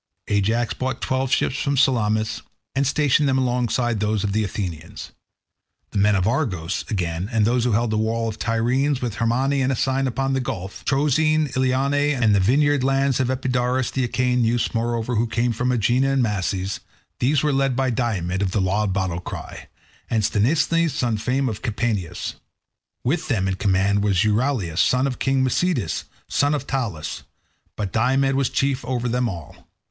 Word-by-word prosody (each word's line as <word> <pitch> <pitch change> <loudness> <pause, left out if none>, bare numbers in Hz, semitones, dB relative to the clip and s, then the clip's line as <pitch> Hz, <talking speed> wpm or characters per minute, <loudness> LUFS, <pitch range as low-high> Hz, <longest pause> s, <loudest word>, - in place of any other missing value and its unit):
Ajax 110 +3 +1
brought 130 0 -3
twelve 130 0 -1
ships 135 - +1
from 140 -1 0
Salamis, 110 -5 +1 0.3
and 135 0 +1
stationed 145 0 +2
them 130 - +2
alongside 120 -2 0
those 105 0 0
of 100 - -1
the 110 +1 +1
Athenians. 85 -6 -5 0.8
The - - -1
men 105 +1 +4
of 95 +1 +1
Argos, 95 - -1
again, 90 -2 -2
and 110 -3 +2
those 120 +1 +1
who 120 - +1
held 115 +1 +1
the 110 - +1
walls 115 0 -1
of 110 - -15
Tiryns, 125 +5 +1
with 120 -5 -4
Hermione, 130 +4 +1
and 135 +1 +1
Asine 135 +1 0
upon 135 +2 -1
the 135 - +1
gulf; 95 -6 -5
Troezene, 150 +2 +2
Eionae, 135 +2 +1
and 110 -3 +4
the 100 - +4
vineyard 140 +7 +3
lands 135 0 +2
of 130 -1 +1
Epidaurus; 125 -1 0
the 130 - -1
Achaean 125 +1 +1
youths, 115 +1 0
moreover, 115 0 -1
who 115 +2 +1
came 115 +1 0
from 125 +3 0
Aegina 125 +3 +2
and 135 -2 +2
Mases; 95 -2 -2 0.4
these 140 +3 +2
were 150 -1 +2
led 135 -1 +1
by 130 0 +1
Diomed 100 -6 -1
of 100 - +1
the - - +1
loud 100 +1 0
battle 95 -3 -1
cry, - - -8 0.4
and 110 -2 +1
Sthenelus 155 +11 +2
son 120 -3 0
of 105 - -2
famed 125 -3 -1
Capaneus. 105 -7 -2 0.7
With 155 +7 -1
them 105 -9 0
in 95 - 0
command 100 +1 +2
was 100 -2 +2
Euryalus, 105 - 0
son 125 +1 +3
of 135 -2 -3
king 135 -1 +1
Mecisteus, 130 - 0 0.2
son 145 +1 +1
of 140 -2 -4
Talaus; 115 - -3 0.5
but 100 -3 -4
Diomed 135 +4 +2
was 135 -1 +1
chief 135 -1 0
over 125 -1 -2
them 120 0 0
all. 85 -6 -10
120 Hz, 175 wpm, -22 LUFS, 105-135 Hz, 0.8 s, men